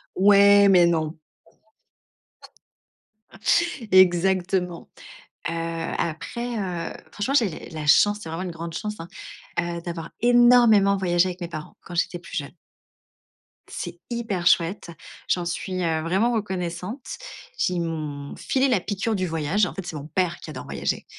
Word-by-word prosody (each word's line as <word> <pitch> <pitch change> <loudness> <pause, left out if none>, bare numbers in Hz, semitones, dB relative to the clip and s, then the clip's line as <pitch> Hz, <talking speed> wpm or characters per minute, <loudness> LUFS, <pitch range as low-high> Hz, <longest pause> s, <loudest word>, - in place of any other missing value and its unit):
Ouais, 200 +1 +6
mais, 180 -2 +6
non. 160 -2 0 2.7
Exactement. 185 -1 +3 0.6
Heu, 165 - -3 0.4
après, 235 +9 -3
heu, 180 -5 -3 0.2
franchement, 220 +7 -2
j'ai 215 - 0
la 155 -2 -6
chance, 205 +7 +5
c'est 165 - -7
vraiment 165 +3 -4
une 180 - -4
grande 165 0 -7
chance, 210 +5 -4
hein, 165 - -7 0.5
heu, 170 0 -2
d'avoir 170 -2 -6
énormément 240 -4 +6
voyagé 175 -1 +2
avec 180 +1 -8
mes 175 - -3
parents, 155 -2 -8
quand 175 - -10
j'étais 175 0 0
plus - - -10
jeune. 140 +4 -5 1.1
C'est 175 - -7
hyper 225 -7 -3
chouette. 170 +1 +2 0.4
J'en 175 -1 +1
suis, 185 +2 -3
heu, 160 -1 0
vraiment 190 +9 +1
reconnaissante. 190 +2 -4 0.5
J'ai 180 - 0
ils 175 - 0
m’ont 150 -4 -5
filé 265 +1 +1
la 245 -7 +2
piqûre 205 +3 -2
du 185 -2 -1
voyage. 165 +5 +1
En - - -5
fait, 195 - -6
c'est 175 - -6
mon 145 0 -7
père 175 +2 -1
qui - - -10
adore - - -7
voyager, - - -3
180 Hz, 145 wpm, -24 LUFS, 170-205 Hz, 2.7 s, Ouais